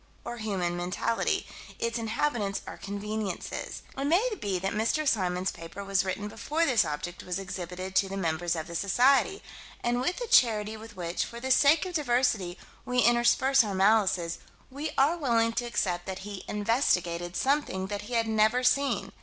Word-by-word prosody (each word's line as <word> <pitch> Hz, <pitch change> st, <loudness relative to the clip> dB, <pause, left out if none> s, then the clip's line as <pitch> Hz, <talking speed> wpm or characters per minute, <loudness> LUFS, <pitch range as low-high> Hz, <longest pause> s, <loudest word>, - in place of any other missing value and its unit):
Or 240 Hz, -, -5 dB
human 190 Hz, -6 st, -2 dB
mentality: 180 Hz, +6 st, -1 dB, 0.3 s
its 230 Hz, 0 st, -2 dB
inhabitants 225 Hz, -3 st, -1 dB
are -, -, -7 dB
conveniences. 205 Hz, -1 st, -5 dB
It 275 Hz, -, -2 dB
may 360 Hz, +12 st, +3 dB
be 195 Hz, -3 st, -1 dB
that 195 Hz, +2 st, -2 dB
Mr. 230 Hz, +8 st, 0 dB
Symons' 185 Hz, -5 st, +1 dB
paper 170 Hz, +4 st, -8 dB
was 195 Hz, 0 st, +1 dB
written 195 Hz, +2 st, -3 dB
before 295 Hz, +10 st, -1 dB
this 255 Hz, -7 st, +4 dB
object 160 Hz, +4 st, -5 dB
was 180 Hz, 0 st, -3 dB
exhibited 185 Hz, -1 st, -6 dB
to 195 Hz, -, +3 dB
the 195 Hz, -, -4 dB
members 170 Hz, -1 st, -1 dB
of 160 Hz, -1 st, -4 dB
the 170 Hz, -, -9 dB
Society, 250 Hz, -, +3 dB, 0.4 s
and 240 Hz, +1 st, +1 dB
with 355 Hz, +8 st, -1 dB
the -, -, -3 dB
charity 220 Hz, -, +3 dB
with 220 Hz, 0 st, -11 dB
which, 170 Hz, -1 st, -2 dB
for 235 Hz, -, -8 dB
the 260 Hz, +2 st, -3 dB
sake 290 Hz, +7 st, +5 dB
of 365 Hz, -, -5 dB
diversity, 240 Hz, -, +1 dB, 0.3 s
we 250 Hz, -, -3 dB
intersperse 240 Hz, +3 st, +4 dB
our 205 Hz, -3 st, -3 dB
malices, 190 Hz, -4 st, +2 dB, 0.3 s
we 290 Hz, +4 st, -4 dB
are 295 Hz, +6 st, +4 dB
willing 230 Hz, -6 st, +2 dB
to 240 Hz, +1 st, -1 dB
accept 180 Hz, -7 st, -1 dB
that 190 Hz, 0 st, -5 dB
he 205 Hz, -2 st, -7 dB
"investigated" 180 Hz, -6 st, 0 dB
something 270 Hz, -9 st, 0 dB
that 205 Hz, +1 st, -4 dB
he 245 Hz, -, -2 dB
had 230 Hz, -1 st, +2 dB
never 220 Hz, +3 st, +3 dB
seen. 275 Hz, +2 st, +1 dB
215 Hz, 175 wpm, -28 LUFS, 185-250 Hz, 0.4 s, sake